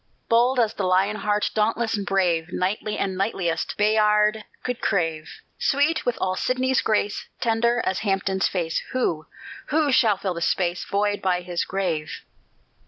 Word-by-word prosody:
Bold 240 +3 +3
as 225 -2 +2
the 200 - -4
Lion 190 +3 +2
heart, 210 0 0
Dauntless 225 +1 +1
and 205 -1 -4
brave; 175 -4 +1
Knightly 205 +4 -2
as - - 0
knightliest 185 -3 -2
Bayard 210 0 +3 0.2
could 250 -1 -3
crave; 165 -4 -1 0.3
Sweet 290 +3 +1
with 245 - +1
all 185 0 0
Sidney's 255 +3 +1
grace, 210 -1 -1
Tender 235 +1 +1
as 190 - 0
Hampden's 195 -2 0
face; 170 -3 -1
Who 165 -12 -1 0.4
who 300 -1 +2
shall 225 -6 +4
fill 190 -2 -2
the 170 - -6
space 175 0 0
Void 205 0 0
by 180 -2 +1
his 175 -1 -2
grave? 175 -6 -3
205 Hz, 155 wpm, -24 LUFS, 185-225 Hz, 0.4 s, shall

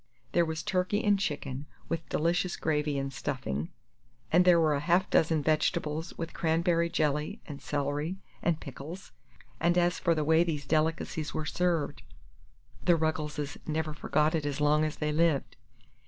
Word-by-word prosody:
There 170 - +3
was 160 0 -3
turkey 185 +3 0
and 205 -2 +3
chicken, 145 -6 -3 0.2
with 165 -1 -3
delicious 175 +3 0
gravy 150 -2 0
and 135 0 -3
stuffing, 80 - -3 0.6
and 180 +3 +5
there 175 -2 +7
were 155 -3 +3
half 175 +5 +3
a - - -29
dozen 160 -2 +3
vegetables, 155 +1 0
with 165 -1 -5
cranberry 170 +1 +1
jelly, 155 +6 0
and 145 -3 -8
celery, 145 +5 -2 0.2
and 165 -2 +1
pickles; 155 +6 -9 0.5
and 175 +2 +2
as 175 -1 +2
for 170 -2 +2
the 155 - 0
way 160 +2 +4
these 150 -4 -3
delicacies 160 +1 0
were 155 - -2
served, 170 -1 0 0.8
the 175 - +5
Ruggleses 150 -2 -2
never 155 0 -1
forgot 150 +1 +1
it 160 -2 0
as 145 -1 -2
long 150 +1 +3
as 155 - -3
they 150 0 -1
lived. 155 -2 +1
160 Hz, 160 wpm, -30 LUFS, 150-170 Hz, 0.8 s, there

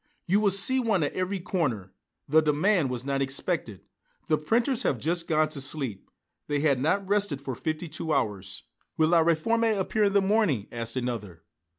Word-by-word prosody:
"You 195 +4 +3
will 210 -1 +3
see 200 +7 +4
one 220 -9 +1
at 145 - -2
every 185 +1 -2
corner. 130 - -2 0.3
The 160 +2 +5
demand 155 +1 +2
was 125 0 -5
not 140 0 -1
expected. 135 - -2 0.5
The 155 - +3
printers 230 - +1
have 135 - 0
just 170 +7 -1
gone 155 -1 +2
to 150 -3 -5
sleep. 135 -7 -3 0.4
They 145 -1 -1
had 140 -4 +2
not 190 +7 0
rested 200 -8 0
for 135 -1 -5
fifty 155 +6 -4
two 160 +1 -5
hours." 100 -9 -2 0.3
"Will 155 0 +3
'La 170 -1 +5
Réforme' 220 +7 +1
appear 210 +3 +1
in 200 - +1
the 200 - +5
morning?" 190 - +1
asked 115 0 -5
another. 115 -9 -4
155 Hz, 185 wpm, -27 LUFS, 135-195 Hz, 0.5 s, The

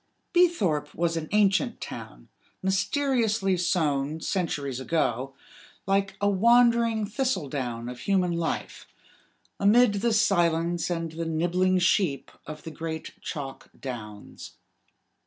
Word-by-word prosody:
Beethorpe 200 - +2
was 165 0 0
an 160 -1 -4
ancient 200 -2 +2
town, - - -9 0.4
mysteriously 215 -1 +1
sown, 155 -4 0
centuries 145 -8 -2
ago, 135 -3 -1 0.5
like 195 0 0
a 205 - +1
wandering 230 +1 +4
thistle 225 - -1
down 120 -4 -4
of 125 0 -7
human 185 -3 +1
life, 170 -1 -3 0.7
amid 215 +2 +5
the 235 +1 +2
silence 175 -6 +2
and 165 -2 -2
the 165 +1 -4
nibbling 175 +3 +1
sheep 175 -5 +1 0.2
of 155 -1 -8
the 160 - -7
great 160 0 -6
chalk 135 -3 -6
downs. 105 -6 -8
175 Hz, 115 wpm, -26 LUFS, 150-205 Hz, 0.7 s, amid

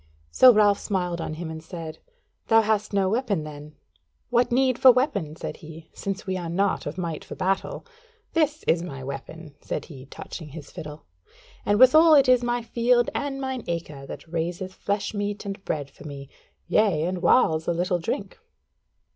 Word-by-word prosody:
So 255 - +8
Ralph 210 -2 +4
smiled 180 -4 -2
on 155 - -4
him 165 0 -6
and 160 0 -7
said: 160 -1 -8 0.5
"Thou 225 0 +6
hast 215 -1 0
no 195 -2 +2
weapon, 210 -7 0
then?" 150 0 -10 0.6
"What 245 0 +2
need 255 0 +2
for 260 - +9
weapon?" 250 - 0
said - - -6
he; 160 0 -12
"since 195 0 -5
we 190 -1 -2
are 175 -2 -5
not 195 +1 0
of 145 - -5
might 170 -4 -4
for - - -9
battle. 190 +1 -2 0.5
This 310 -1 +1
is 165 - +2
my 135 -7 -7
weapon," 140 +3 -8
said 150 - -4
he, 135 -4 -12
touching 160 +3 -8
his 145 0 -10
fiddle, 150 0 -9 0.6
"and 205 - +3
withal 310 +5 +8
it 275 -2 +5
is 250 -1 +5
my 240 0 -1
field 240 +1 +2
and 280 -1 -3
mine 265 -2 -3
acre 150 -5 -5
that - - -9
raiseth 170 +3 -3
flesh 200 +2 -2
meat 205 0 -3
and 195 0 -6
bread 145 -3 -3
for - - -15
me: 140 -1 -8 0.4
yea, 195 -8 +2
and 180 +1 -2
whiles 160 -8 +3
a - - +2
little 175 +1 0
drink." 195 - -4
185 Hz, 180 wpm, -25 LUFS, 160-230 Hz, 0.6 s, for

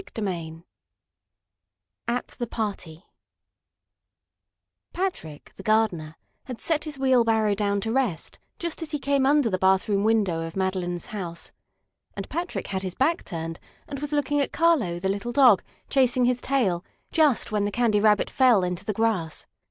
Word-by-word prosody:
CHAPTER 220 - -5
IX 165 -3 -5 1.5
AT 240 +1 -1
THE 240 - -2
PARTY 195 -7 -5 1.9
Patrick, 345 - -4
the - - -8
gardener, 195 -8 +1 0.3
had 250 -3 -7
set 320 -2 0
his 300 -2 -6
wheelbarrow 230 -5 +3
down 200 0 0
to 225 - -2
rest 245 -10 -1 0.2
just 340 -1 -4
as 325 - -5
he 300 - -2
came 280 -1 +1
under 290 -2 +4
the 185 -4 -1
bathroom 190 +2 +2
window 210 -7 +2
of 165 0 -6
Madeline's 185 -2 -2
house. 175 -5 -5 0.6
And - - -5
Patrick 345 +1 -3
had 190 -1 -3
his 185 -2 -5
back 325 +6 +1
turned, 165 -2 -5 0.3
and 280 -2 -6
was 295 +1 -5
looking 290 0 +1
at 280 - -1
Carlo, 305 - +2
the 190 - -2
little 200 +5 -2
dog, 245 -6 +6 0.3
chasing 255 -2 +3
his 250 0 +1
tail 210 -11 0 0.3
just 300 -10 +2
when 210 -1 +1
the 205 - -1
Candy 225 -2 +2
Rabbit 210 -1 +3
fell 245 -7 +4
into 180 +1 -3
the 215 - -2
grass. 195 -7 -1
220 Hz, 160 wpm, -25 LUFS, 185-265 Hz, 1.9 s, dog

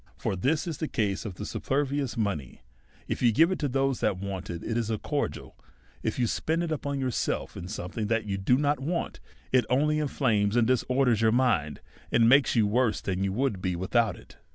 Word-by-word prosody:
For - - -2
this 135 - 0
is 165 -5 -4
the 155 - -1
case 100 -6 -1
with 105 0 -6
superfluous 140 -2 -1
mo 105 -3 +1
ney; 70 -6 -10 0.4
if - - -3
you 120 - +5
give 165 - +4
it 185 - -2
to 145 - 0
those 135 0 0
that 95 - +1
want 95 -1 -5
it^ 85 -1 -5
it 115 - -3
is 115 -2 -1
a 110 - 0
cor - - -1
dial; - - -11 0.5
if - - -2
you 125 - +2
spend 160 +8 0
it 170 - -3
upon 140 -2 -2
yourself 130 -3 -2
in 90 - -7
something 105 +2 -4
that 115 0 0
you 100 -2 -2
do 125 +7 +3
not 145 +1 +1
want, 165 +6 -3 0.3
it 130 -1 +4
only 150 +4 +2
inflames 115 -8 +1
and 120 -2 +4
disorders 125 -1 +2
your 110 -1 +4
mind, 110 - +1 0.3
and 115 0 +4
makes 135 +3 +5
you 110 -3 +4
worse 115 +2 +1
than 95 0 -2
you 100 - 0
would 110 -3 -1
be 90 -1 -1
with 95 +6 -6
out 115 -5 +3
it. - - -16
120 Hz, 225 wpm, -28 LUFS, 100-135 Hz, 0.5 s, you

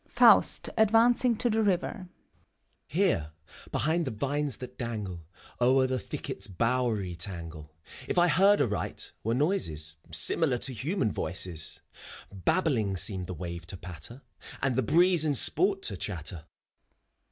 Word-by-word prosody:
FAUST - - +5
{advancing 230 +3 +4
to 245 - 0
the 225 -1 +1
river) 190 -1 -1 0.4
» - - -48 0.2
Here, 150 - 0 0.4
behind 160 +3 0
the - - -2
vines 140 +5 -2
that 125 0 -9
dangle 100 -9 -5 0.3
O'er 130 +2 +4
the 130 0 -1
thicket's - - -6
bowery 110 -2 -1
tangle. 85 -4 -5 0.4
If - - -2
I 175 0 +5
heard 195 +6 +4
aright, 105 -4 -2
were 115 +2 0
noises 80 - -1
Similar 145 -7 +3
to 130 +2 +2
human 130 - -1
voices. 90 -5 -3 0.5
Babbling 110 - 0
seemed 95 -1 +2
the 90 - -5
wave 85 -1 -7
to 95 - -7
patter, 90 - -8 0.4
And 130 -2 0
the 130 - +2
breeze 175 +6 +4
in 150 -2 +1
sport 190 - +2
to 100 - -1
chatter. 85 -4 -5
125 Hz, 140 wpm, -28 LUFS, -, 0.5 s, FAUST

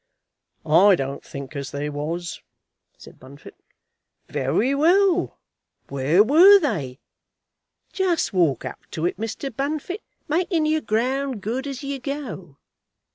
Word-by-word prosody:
"I 185 +6 +6
don't 135 -2 -5
think 140 +1 -9
as 140 -1 -4
they 145 +1 -4
was," 155 +4 -4 0.6
said - - -15
Bunfit. 140 +3 -14 0.7
"Very 210 - 0
well; 360 +5 +3 0.5
where 140 +8 +3
were 345 - +8
they? 165 - -2 1.0
Just 365 - 0
walk 165 -9 +1
up - - -6
to 160 - -3
it, 175 - -1
Mr. 225 +3 -5
Bunfit, 310 - -3 0.3
making 335 0 0
your 310 0 +1
ground 255 +2 -1
good 255 +6 -3
as 275 0 -6
you 275 0 -4
go. 250 - -6
225 Hz, 125 wpm, -23 LUFS, -, 1.0 s, were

